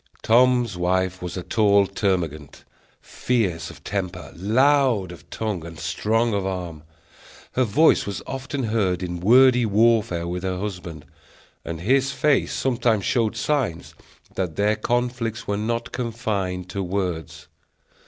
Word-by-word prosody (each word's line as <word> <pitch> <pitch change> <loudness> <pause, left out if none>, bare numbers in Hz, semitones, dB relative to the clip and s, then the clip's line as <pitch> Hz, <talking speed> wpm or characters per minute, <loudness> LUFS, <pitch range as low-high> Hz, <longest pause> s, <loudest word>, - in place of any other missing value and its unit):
Tom's 120 -2 +3
wife 95 +1 0
was 90 +1 -5
a 90 - -4
tall 100 -2 +3
termagant, 90 -7 -2 0.4
fierce 95 -10 -1
of - - -13
temper, 95 -3 -4
loud 120 0 +2
of 85 - -13
tongue, 105 -7 -3
and 85 0 -9
strong 110 +8 0
of 100 -1 0
arm. 90 -5 -4 0.7
Her 130 - +1
voice 140 +6 +3
was 100 - -4
often 135 +1 -4
heard 100 -5 0
in 90 -1 -4
wordy 125 +5 +5
warfare 110 -5 +2
with 90 +1 -3
her 95 0 -2
husband; 90 -6 -6 0.6
and 85 -1 -6
his 135 +7 +2
face 145 0 +1
sometimes 120 -5 0
showed 115 -3 +1
signs 125 - -1 0.4
that 90 -5 -3
their 105 +1 +2
conflicts 115 0 -2
were 100 - 0
not 115 +3 -2
confined 105 -7 -3
to 100 +1 -3
words. 85 -5 -3
100 Hz, 135 wpm, -23 LUFS, 90-120 Hz, 0.7 s, wordy